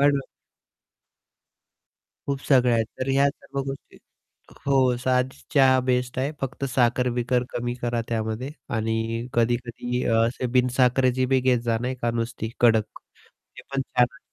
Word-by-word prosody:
हां 145 - +6
ना. 140 - 0 2.1
खूप 140 -1 -1
सगळ्या 125 -3 +5
आहेत. 115 -1 +1
तर 130 - -2
ह्या 140 +1 +4
सर्व 140 -1 -6
गोष्टी 135 0 -8 0.7
हो, 130 -3 +3
साधीच 130 +1 -1
चहा 130 -2 +6
बेस्ट 125 0 0
आहे. 140 +3 -1
फक्त 135 +1 -4
साखर-बिकर 125 0 +1
कमी 120 0 -3
करा 120 -1 0
त्यामध्ये 110 +3 -2 0.3
आणि 115 +1 -2
कधी-कधी 120 +1 -1 0.2
असे 125 +2 -2
बिन-साखरेची 125 0 +3
बी 130 - +4
घेत 125 -1 +3
जा 115 -1 +1
नाही 125 +1 -2
का 120 - +2
नुसती 115 -1 -3
कडक 110 -3 +5 0.7
ते - - -10
पण 135 -1 -1
छान 125 -1 +2
आहे. 140 - -17
125 Hz, 140 wpm, -24 LUFS, 120-130 Hz, 2.1 s, हां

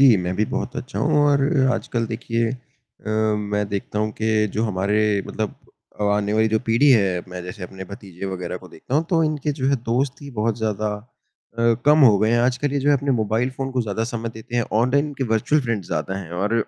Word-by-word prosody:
जी, 130 -5 +7
मैं 90 -1 -2
भी 110 - +2
बहुत 125 - -3
अच्छा 130 - -5
हूँ 150 +1 +2
और 140 -1 +3 0.3
आजकल 115 -1 -2
देखिए 115 0 -1
अ, 125 -3 -11 0.3
मैं 105 0 -1
देखता 100 +1 -3
हूँ 110 0 0
के 110 -1 +2
जो 110 - 0
हमारे 105 +1 0 0.3
मतलब 110 -1 -3 0.5
अब 105 - +2
आने 105 0 +1
वाली 110 +1 +3
जो 110 0 +2
पीढ़ी 115 +6 +4
है 100 -7 +3
मैं 90 0 -6
जैसे 90 +2 -8
अपने 95 +1 -7
भतीजे 95 -1 -8
वग़ैरह 90 -2 -4
को 90 0 -12
देखता 85 +10 -7
हूँ, 155 +3 +3
तो 165 -2 +3
इनके 150 -1 -1
जो 135 -2 -2
है 140 - +3
दोस्त 130 +4 0
ही 140 - -8
बहुत 110 -2 -1
ज़्यादा 110 -1 -1 0.7
अ, 115 0 +4
कम 150 +1 +6
हो 105 -5 +6
गए 110 +2 +2
हैं। 120 - +3
आजकल 130 +3 +1
ये 145 - +1
जो 140 - +1
है 145 - +5
अपने 140 +1 -2
मोबाइल 110 +4 0
फ़ोन 135 0 -3
को 125 -1 +1
ज़्यादा 110 +1 -2
समय 115 0 -4
देते 110 +2 -6
हैं, 120 - +3
ऑनलाइन 135 +7 +2
के 135 - -2
वर्चुअल 130 +7 +2
फ्रेंड्स 115 -7 -2
ज़्यादा 85 +2 -2
हैं 90 -4 -8
और, 100 +6 -1
110 Hz, 225 wpm, -22 LUFS, 100-130 Hz, 0.7 s, जी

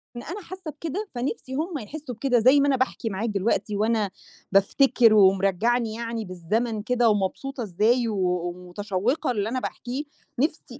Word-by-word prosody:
أنا 345 +12 -6
حاسّة 365 -3 -8
بكده، 335 +8 -5
فنِفْسِي 260 +1 -3
هم 315 +2 -2
يحسّوا 260 +2 -7
بكده 250 0 +2
زي 260 +5 +6
ما 285 - +3
أنا 275 - +3
باحكِي 255 -3 -1
معاك 215 +4 -2
دلوقتي 205 +1 0
وأنا 215 -1 +1 0.4
بافتكر 225 +3 +4
ومرجّعني 205 +4 +3
يعني 230 -1 -4
بالزمن 210 +5 -2
كده 240 0 +2
ومبسوطة 220 +6 -1
إزاي 220 +5 +2
و 215 - -2 0.3
ومتشوّقة 200 - -2
اللي 210 -1 -1
أنا 255 +1 -1
باحكيه، 255 +3 -4 0.4
نِفْسي 280 -3 -2
235 Hz, 150 wpm, -25 LUFS, 205-270 Hz, 0.4 s, زي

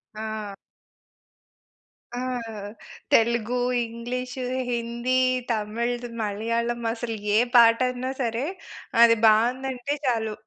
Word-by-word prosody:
ఆ! 215 -2 -5 1.6
ఆ! 245 - -3 0.9
తెలుగు, 235 +1 +3 0.3
ఇంగ్లీషు, 250 +3 -5 0.3
హిందీ, 235 +1 -1 0.4
తమిళ్‌ద్ 235 +3 -2
మలయాళం 230 +3 -1
అసలు 230 -1 -4 0.2
ఏ - - +6 0.2
పాటన్నా 250 +2 +4
సరే! 235 +2 -1 0.6
అది 230 -1 +8
బావుందంటే 250 +5 +2
చాలు 220 -3 0
235 Hz, 80 wpm, -25 LUFS, 225-250 Hz, 1.6 s, అది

